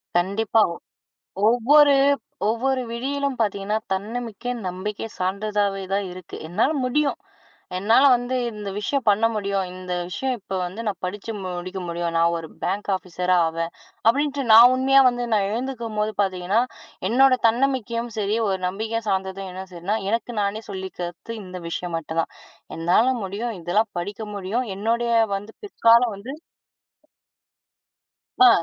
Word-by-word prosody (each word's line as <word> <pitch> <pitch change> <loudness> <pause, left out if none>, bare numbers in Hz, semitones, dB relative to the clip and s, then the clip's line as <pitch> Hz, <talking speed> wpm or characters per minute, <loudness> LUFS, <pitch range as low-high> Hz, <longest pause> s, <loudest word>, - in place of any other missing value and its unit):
கண்டிப்பா. 200 +5 +2
ஒவ் - - -12 0.7
ஒவ்வொரு 280 +5 +6 0.5
ஒவ்வொரு 255 +4 +1
விடியிலும் 275 +3 -2
பார்த்தீங்கன்னா 205 -1 0 0.2
தன்னமிக்கை, 225 +4 -4 0.2
நம்பிக்கை 200 +4 -4
சார்ந்ததாவே 200 +1 -1
தான் 200 0 0
இருக்கு. 180 -1 -9
என்னால 205 - +2
முடியும். 280 +3 +1 0.6
என்னால 225 +8 +4
வந்து 245 +1 -1 0.2
இந்த 210 -1 -6
விஷயம் 270 +5 -1
பண்ண 205 +2 +4
முடியும். 200 -2 -1
இந்த 185 0 -6 0.2
விஷயம் 260 +7 -2
இப்ப 195 -1 -7
வந்து 185 +5 -6
நான் 200 -4 -2
படிச்சு 205 +4 -4
முடிக்க 185 +1 -5
முடியும். 170 0 -2
நான் 170 +1 +3
ஒரு 165 -1 -8
பேங்க் 200 +3 -2
ஆஃபீசரா 180 0 0
ஆவேன், 165 +1 -3 0.4
அப்படின்னுட்டு 280 +3 +2
நான் 235 +3 +9
உண்மையா 270 +1 +5
வந்து 245 -1 -2
நான் 200 -2 +2
எழுந்துக்கும்போது 225 -3 -2
பார்த்தீங்கன்னா 190 +2 +1 0.5
என்னோட 260 +2 +5
தன்னமிக்கையும் 240 -1 0
சரி, 210 +1 0
ஒரு 190 -1 0
நம்பிக்கை 220 +4 -3
சார்ந்ததும் 190 0 -2
என்ன 190 +1 -6
சரின்னா 180 +5 -2
எனக்கு 235 +2 -2
நானே 200 +2 -2
சொல்லிக்கிறது 190 +2 -6
இந்த 185 -1 -8
விஷயம் 170 0 -3
மட்டும்தான். 165 +1 -3 0.5
என்னால 175 +8 +3 0.2
முடியும். 215 +5 -3
இதெல்லாம் 205 +5 +1
படிக்க 205 +5 -6
முடியும். 205 +6 -2
என்னோடய 235 +3 0 0.2
வந்து 205 +3 -9
பிற்காலம் 235 - +4
வந்து 220 +7 -8 2.1
ஆ, - - +10
210 Hz, 130 wpm, -23 LUFS, 185-235 Hz, 2.1 s, ஆ